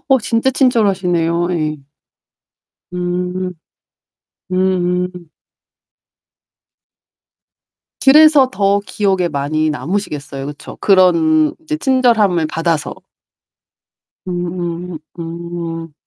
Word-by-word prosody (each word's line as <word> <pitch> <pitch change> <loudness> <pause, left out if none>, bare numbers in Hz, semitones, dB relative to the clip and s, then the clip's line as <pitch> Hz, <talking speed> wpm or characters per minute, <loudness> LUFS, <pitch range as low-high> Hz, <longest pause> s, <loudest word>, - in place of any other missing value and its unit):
어 265 -1 +5
진짜 230 +4 +1
친절하시네요. 185 - +1
예. 155 -2 -1 1.2
음. 180 +1 -3 1.0
음. 180 -1 +1 3.0
그래서 295 -1 +7
더 200 -1 +1
기억에 190 -3 0
많이 155 +2 -1
남으시겠어요. 150 -5 -4
그쵸? 145 0 -9
그런 165 -5 +4
이제 310 -1 -3
친절함을 230 - +2
받아서. 165 -2 -1 1.3
음 175 -1 -4 0.2
음. 165 -1 -6
180 Hz, 155 characters per minute, -17 LUFS, 165-200 Hz, 3.0 s, 그래서